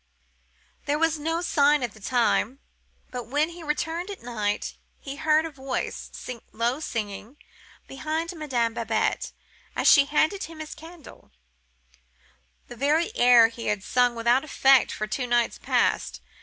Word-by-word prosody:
There 290 +1 +1
was 325 -1 +1
no 325 +3 -1
sign 290 -4 +3
at 240 - -2
the 220 - -15
time. 240 +2 +1 0.5
But 245 -3 -6
when 295 +5 +1
he 340 0 -11
returned 325 +4 -2
at 400 - -8
night, 210 -4 -2 0.3
he 275 0 -8
heard 310 +1 +3
a 325 - -5
voice, 270 -2 -4 0.4
low 235 +5 -1
singing, 225 -2 -5 0.5
behind 315 +5 -3
Madame 250 -8 -1
Babette, 230 0 -1 0.4
as - - +1
she 280 -2 +7
handed 310 +7 +1
him 325 0 -12
his 310 -1 -6
candle, 325 -1 -14 1.4
the 240 - -10
very 310 - +1
air 240 -2 +6
he 230 0 -7
had 210 -2 -1
sung 245 +1 +2
without 235 +3 +2
effect 270 -3 +4
for 215 - -3
two 250 +4 -3
nights 240 -1 +1
past. - - 0
275 Hz, 145 wpm, -25 LUFS, 235-315 Hz, 1.4 s, she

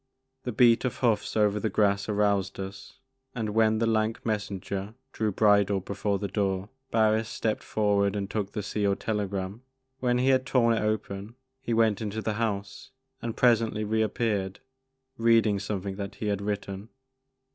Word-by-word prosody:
The 125 - -1
beat 115 +1 +5
of 125 - -2
hoofs 110 -3 +1
over 105 -1 +3
the 110 - -1
grass, 100 0 +1
aroused 100 -2 +1
us, 100 +7 -8 0.4
and 110 -3 -2
when 110 0 +3
the 115 - +1
lank 110 0 0
messenger 100 -1 -3 0.2
drew 110 -4 -1
bridle 100 -1 +3
before 100 +1 -2
the 100 +1 -3
door, 95 -1 -1 0.2
Barris 110 0 +2
stepped 110 -1 -1
forward 100 -2 +1
and 100 -1 -2
took 100 -1 -3
the 105 - -3
sealed 100 -1 0
telegram. 100 -1 -3 0.4
When 125 -1 +1
he 130 +2 +2
had 130 -1 +4
torn 115 -3 +3
it 115 - 0
open 105 0 -3 0.3
he 115 - -1
went 110 -3 +3
into 110 0 -3
the 110 - -1
house 100 +2 -3 0.3
and 115 -1 -4
presently 115 -3 +3
re 110 +1 +1
appeared, 105 -3 -1 0.6
reading 115 -3 +4
something 100 -1 -4
that 100 0 -5
he 105 - -3
had 100 -1 -1
written. 100 0 -4
105 Hz, 165 wpm, -27 LUFS, 100-110 Hz, 0.6 s, beat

